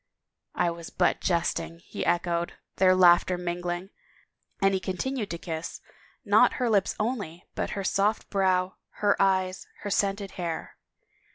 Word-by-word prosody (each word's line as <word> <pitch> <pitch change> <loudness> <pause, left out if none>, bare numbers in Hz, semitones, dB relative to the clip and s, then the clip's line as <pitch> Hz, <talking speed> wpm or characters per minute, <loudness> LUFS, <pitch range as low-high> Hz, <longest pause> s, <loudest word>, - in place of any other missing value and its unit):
" - - -60
I 170 - +2
was 170 0 -8
but 180 - +1
jesting," 170 -1 -1
he - - -5
echoed, 175 0 0 0.2
their 185 -1 +5
laughter 180 0 +5
min 175 0 -3
gling, 175 +2 -4 0.7
and 195 0 +3
he 190 - +1
continued 205 +5 -3
to 170 - -3
kiss, 165 -1 -5 0.5
not - - +5
her 245 -3 0
lips 200 -3 +2
only, 210 -7 -3
but - - -2
her 195 - -2
soft 200 +3 +1
brow, 185 -2 +1 0.3
her 205 - +5
eyes, 190 -1 +1
her 205 - -4
scented 200 0 0
hair. 165 -2 -4
185 Hz, 155 wpm, -27 LUFS, 175-195 Hz, 0.7 s, their